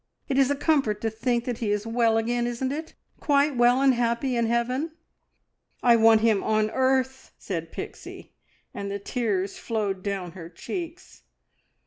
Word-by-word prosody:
It 270 - +1
is 270 -1 +4
a 285 - +1
comfort 275 -8 +1
to 225 - -1
think 235 +2 -1
that 245 -3 -3
he 220 - -1
is 210 +1 -1
well 225 -1 +2
again, 240 +1 0
isn't 240 +2 -2
it? 315 +3 -6 0.2
Quite 285 -1 +2
well 245 +2 +4
and 270 -1 +5
happy 240 +2 0
in 235 -1 +1
heaven!" 250 +7 -1 0.9
"I 240 -1 +6
want 225 -1 +5
him 220 -3 +3
on 215 0 +1
earth!" 260 0 0
said 165 -3 -5
Pixie, - - -9 0.4
and 200 0 -5
the 200 - -3
tears 200 -3 -2
flowed 205 -4 -2
down 195 -3 -4
her 170 -2 -10
cheeks. 350 - -7
235 Hz, 165 wpm, -25 LUFS, 215-265 Hz, 0.9 s, I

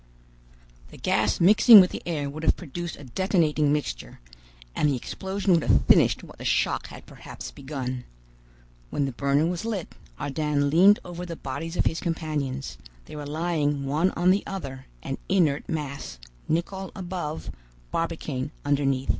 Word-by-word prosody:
The - - -14
gas 105 0 +1
mixing 215 +5 +9
with 185 -1 +5
the - - -5
air 150 -4 -2
would 145 +3 -6
have 160 - +3
produced 175 +1 -6
a 145 - -12
detonating 155 - +1
mixture, 145 - -3 0.6
and 150 - +2
the 140 - +1
explosion 190 - -2
would 170 - +4
have - - +3
finished - - +4
what - - -13
the - - -7
shock - - +1
had - - -12
perhaps - - -9
begun. 130 -3 -5 0.8
When 145 - 0
the 135 - -2
burner 140 +4 +1
was 175 +2 -2
lit, 215 -6 -4 0.3
Ardan 145 -1 0
leaned 195 +6 +7
over 175 0 -6
the 170 -2 -5
bodies 165 +5 -5
of - - +2
his 165 - 0
companions: 150 -5 -3 0.3
they - - -10
were 145 -1 -6
lying 150 -3 -1
one 155 +7 +2
on 175 +2 +4
the 200 +2 +2
other, 135 -9 -6 0.2
an 135 - -4
inert 165 -7 +2
mass, 145 - -4 0.3
Nicholl 190 +4 -2
above, 175 - -5 0.4
Barbicane 155 -5 -2 0.2
underneath. 140 -2 +1
155 Hz, 160 wpm, -26 LUFS, 140-175 Hz, 0.8 s, mixing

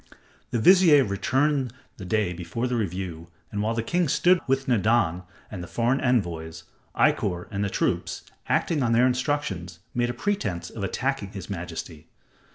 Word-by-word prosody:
The - - -1
vizier 165 - +6
returned 130 +5 0 0.2
the 95 - -8
day 100 -1 0
before 90 +8 -4
the 125 -1 -1
review, 90 -6 -3 0.2
and 105 - -2
while 110 +2 0
the 115 - -1
king 175 +7 +1
stood 175 +6 +4
with 135 +1 +1
Nadan 110 -7 +2 0.3
and 100 -4 -6
the - - -8
foreign 120 +6 +1
envoys, 85 -10 -1 0.3
Ikkor 90 0 +1
and 100 0 -1
the 100 - 0
troops, - - -1 0.3
acting 155 -4 +1
on 115 -2 +2
their 120 +2 +5
instructions, 125 - -1 0.2
made 120 0 0
a - - -2
pretense 130 - -2
of 105 - -6
attacking 120 0 -2
his 100 +1 -7
majesty. 85 -3 -6
110 Hz, 165 wpm, -25 LUFS, 90-130 Hz, 0.3 s, vizier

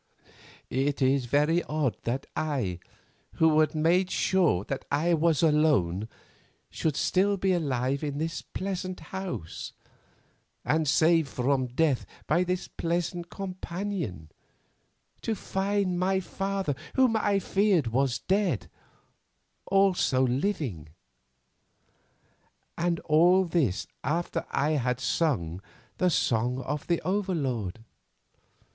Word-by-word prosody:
"It 135 +2 0
is 135 -1 +2
very 150 +7 +2
odd 150 -5 0
that 130 +4 -2
I, 130 - -1 0.5
who 160 -1 +4
had 155 0 +2
made 175 +4 +3
sure 175 - +2
that 135 +5 -4
I 160 +5 +2
was 160 -2 +2
gone, 145 - +2 0.6
should 160 - -1
be - - -7
still 200 +2 +2
alive 140 -8 0
in 145 -1 -3
this 165 +2 -2
pleasant 185 -1 -4
house, 190 - -5 0.9
and 155 0 +1
saved 160 +1 +4
from 130 +1 0
death 135 +1 +1 0.2
by 180 - +2
this 180 0 -2
pleasant 175 +1 -2
companion, 185 - -5 0.9
to 225 - -1
find 195 -2 -1
my 190 +1 +2
father, 195 -3 -2 0.2
whom 255 -4 +4
I 205 -2 +2
feared 195 -4 +2
was 120 +1 +1
dead, 185 - 0 1.0
also 190 -9 +3
living. 125 - -2 1.9
And 170 -1 0
all 175 +4 +5
this 150 - 0 0.2
after 165 +6 -2
I 145 +3 +1
had 125 -4 0
sung 105 - 0 0.4
the 180 - +3
'Song 125 -4 +1
of 150 +3 -4
the 170 -1 +2
Overlord! 140 - -2
155 Hz, 110 wpm, -28 LUFS, 130-185 Hz, 1.9 s, all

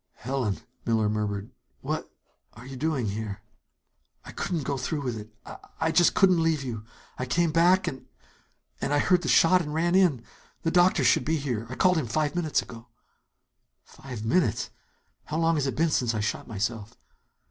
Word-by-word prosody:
"Helen!" 125 -4 -2 0.2
Miller 110 -2 +1
murmured. 105 -1 -3 0.3
"What - - -3 0.4
are 115 +2 -13
you 135 0 -8
doing 140 -2 -1
here?" 105 -1 -4 0.8
"I - - -9
couldn't 165 -5 -3
go 140 - -2
through 145 +3 -3
with 125 -4 -3
it. 105 0 -8 0.2
I - - -9 0.2
I 160 0 +1
just 175 +1 +4
couldn't 185 -3 +4
leave 160 -3 +1
you. 115 -5 -5 0.4
I 130 - -2
came 165 +5 +1
back 175 +4 +4
and 130 - -5 0.7
and 145 - 0
I - - +4
heard 180 +4 +3
the - - -4
shot 180 +2 +5
and 150 -2 -5
ran 170 +2 +1
in. 175 -11 +3 0.4
The 165 - +1
doctor 175 -4 +4
should 125 - +4
be 160 +4 0
here. 120 -6 -3
I 130 - -5
called 180 +3 +3
him 135 - -3
five 145 +6 0
minutes 165 -4 0
ago." 115 0 -12 1.0
"Five 125 -5 -9
minutes... 115 - +1 0.5
How 155 - -3
long 165 0 +3
has 145 -3 0
it 135 - -2
been 165 0 +2
since 120 -5 +1
I - - -1
shot 105 +1 -2
myself?" 110 0 -4
135 Hz, 185 wpm, -27 LUFS, 115-165 Hz, 1.0 s, shot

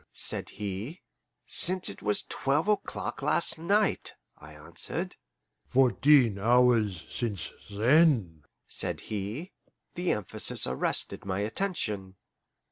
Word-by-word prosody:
said - - +1
he. 105 - -6 0.5
"Since 185 0 +3
it 100 - -1
was 105 0 0
twelve 145 +7 -1
o'clock 210 -1 -2
last - - +2
night," 200 +5 +1 0.2
I 75 +2 -14
answered. 75 +2 -4 0.5
"Fourteen 125 -2 +4
hours 115 -5 +3
since 105 -8 -4 0.2
THEN," 110 - +2 0.2
said - - -1
he. 110 - -5 0.4
The 175 0 0
emphasis 105 -5 +1
arrested 65 +1 -2
my 95 0 -2
attention. 105 - -2
110 Hz, 105 wpm, -28 LUFS, 95-150 Hz, 0.5 s, Fourteen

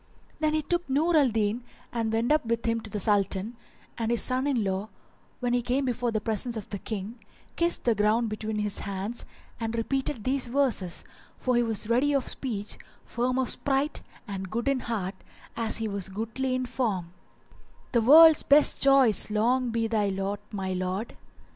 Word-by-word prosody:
Then 310 0 +1
he 310 - 0
took 345 0 -2
Nur 315 +6 +2
al 285 -4 +5
Din 220 +1 -1 0.3
and 225 -2 -1
went 230 +4 0
up 305 0 +3
with 230 0 -2
him 230 0 0
to 220 - -10
the 210 - -4
Sultan, 200 +2 0 0.4
and 225 -1 -1
his 235 -1 +3
son 255 +2 0
in 255 -6 +1
law, 195 +2 -2 0.5
when 245 -1 0
he 245 - +2
came 255 +3 0
before 245 -1 -1
the 220 - 0
presence 225 +2 -3
of 210 - -7
the 200 - -4
King, 215 +3 -6 0.4
kissed 340 0 +1
the 235 - +3
ground 215 +3 +2
between 215 0 -4
his 210 -1 -2
hands 200 +3 -5 0.3
and 225 0 -3
repeated 260 0 -1
these 260 +1 +1
verses, 240 -9 0 0.3
for 250 -1 0
he 240 - +4
was 220 -3 -1
ready 255 +5 +2
of 275 -3 0
speech, 215 -6 -2 0.3
firm 250 +2 -1
of 260 -1 0
sprite 280 +2 -1 0.3
and 190 -2 -5
good 235 +5 -3
in 275 -1 +2
heart 205 -6 -3 0.4
as 225 -1 -2
he 225 0 -2
was 200 -2 -2
goodly 230 +6 -2
in 255 0 -1
form:— 195 -9 -2 0.8
"The 235 - +3
world's 315 +6 +8
best 290 +1 +5
joys 270 -8 +5
long 240 +4 +1
be 230 0 0
thy 215 -3 +1
lot, 195 +1 -2
my 190 -2 -3
lord! 185 +4 -3
230 Hz, 185 wpm, -27 LUFS, 210-255 Hz, 0.8 s, world's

